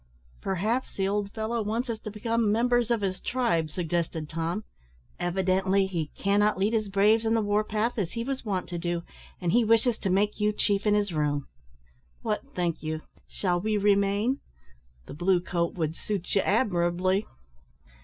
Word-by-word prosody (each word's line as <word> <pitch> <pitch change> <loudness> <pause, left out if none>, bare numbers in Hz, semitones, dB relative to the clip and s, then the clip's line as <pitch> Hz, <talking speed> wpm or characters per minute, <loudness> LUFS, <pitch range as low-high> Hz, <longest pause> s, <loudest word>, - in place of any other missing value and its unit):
"Perhaps 215 +8 -1
the 195 -1 +1
old 200 0 -1
fellow 225 +2 -2
wants 225 +4 -1
us 230 -2 -3
to 215 - -6
become 220 +1 0
members 240 +1 +2
of 235 -3 +1
his 190 -2 -2
tribe," 230 -11 0
suggested 165 -2 -2
Tom. 165 +6 -2 0.6
"Evidently 190 +2 +2
he 170 -5 -2
cannot 205 +1 +2
lead 200 +4 +1
his 215 -3 0
braves 210 +3 +4
on 225 0 +2
the 225 - +3
war 205 +1 +2
path 220 +2 -1
as 180 -4 -2
he 230 - -2
was 270 +1 -3
wont 195 -5 -2
to 175 -1 -3
do, 175 0 -2 0.4
and 175 -2 0
he 240 +4 +4
wishes 225 +1 +3
to 195 - -1
make 205 +3 +1
you 210 0 +2
chief 205 0 +1
in 210 - +4
his 205 -3 0
room. 145 -2 0 0.8
What - - 0
think 175 -2 -1
you? 155 0 -3 0.2
Shall 175 -3 -1
we 215 +1 +1
remain? 205 +5 +2 0.7
The - - -9
blue 175 +4 +2
coat 170 -1 -1
would 160 -2 -1
suit 195 -2 -3
you 195 - +4
admirably." 185 -2 +1
200 Hz, 175 wpm, -27 LUFS, 175-220 Hz, 0.8 s, braves